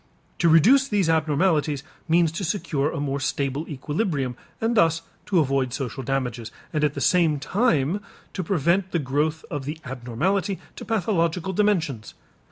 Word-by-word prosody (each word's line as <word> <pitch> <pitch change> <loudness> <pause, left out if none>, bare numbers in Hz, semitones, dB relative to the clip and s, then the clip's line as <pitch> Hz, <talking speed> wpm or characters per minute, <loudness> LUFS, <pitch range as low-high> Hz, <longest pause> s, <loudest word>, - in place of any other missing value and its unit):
To 170 - +4
reduce 245 - +6
these 200 -7 +1
abnormalities 155 -2 +1 0.2
means 165 -1 +3
to 165 +5 -4
secure 155 -6 -1
a - - -4
more 140 -1 -1
stable 140 +2 -2
equilibrium 145 - -2 0.2
and 230 +1 0
thus 165 -4 +3 0.2
to 195 - +1
avoid 135 -5 +1
social 135 -1 -4
damages, 125 -3 -2 0.2
and 150 -1 0
at 150 -1 +1
the - - -3
same 165 -4 +3
time 175 - +1 0.3
to 185 - -3
prevent 175 +2 +1
the - - +3
growth 150 +2 -1
of 145 -2 -4
the 150 +3 -4
abnormality 135 - -1 0.2
to - - -7
pathological 185 -4 0
dimensions. 170 - 0
160 Hz, 155 wpm, -24 LUFS, 140-185 Hz, 0.3 s, reduce